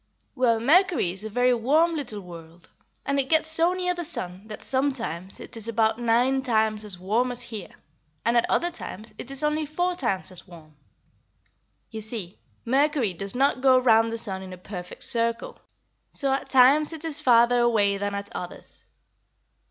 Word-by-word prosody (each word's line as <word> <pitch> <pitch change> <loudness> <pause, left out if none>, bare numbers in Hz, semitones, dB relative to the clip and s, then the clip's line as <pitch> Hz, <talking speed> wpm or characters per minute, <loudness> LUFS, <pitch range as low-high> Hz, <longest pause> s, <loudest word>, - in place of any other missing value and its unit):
Well, 240 -4 +2
Mercury 330 - +3
is 190 +3 -7
a 220 - -5
very 245 +3 +2
warm 300 +9 +2
little 225 -9 -5
world, 170 -1 -13 0.4
and 280 0 0
it 270 - -2
gets 315 0 +3
so 330 +3 +5
near 360 -1 -1
the 350 -1 -5
sun 190 - -2
that 215 - -8
sometimes 235 - -2
it - - -9
is 225 -1 -6
about 225 0 +1
nine 245 +3 +2
times 220 -4 0
as 205 -4 -6
warm 220 +8 0
as 245 - -5
here, 210 -6 -8 0.5
and 235 - +2
at 235 - +2
other 345 +1 +1
times 220 - -8
it 260 - -8
is 275 +2 -3
only 300 +1 0
four 355 +4 -1
times 195 - -2
as 185 - -10
warm. 160 -4 -15 1.2
You 220 -1 -6
see, 210 -4 -3 0.3
Mercury 270 - +1
does 195 +6 -5
not 265 0 +1
go 260 -1 +5
round 225 -3 +3
the 230 - -3
sun 195 -4 -3
in 185 -1 -9
a - - -9
perfect 180 -1 -8
circle, 230 - -1 0.5
so 275 -2 -1
at 270 - -3
times 275 +5 +6
it 320 0 -6
is 310 -1 -3
farther 240 -2 +4
away 210 -4 +2
than 205 0 -3
at 200 0 -7
others. 180 - -9
235 Hz, 185 wpm, -25 LUFS, 205-275 Hz, 1.2 s, times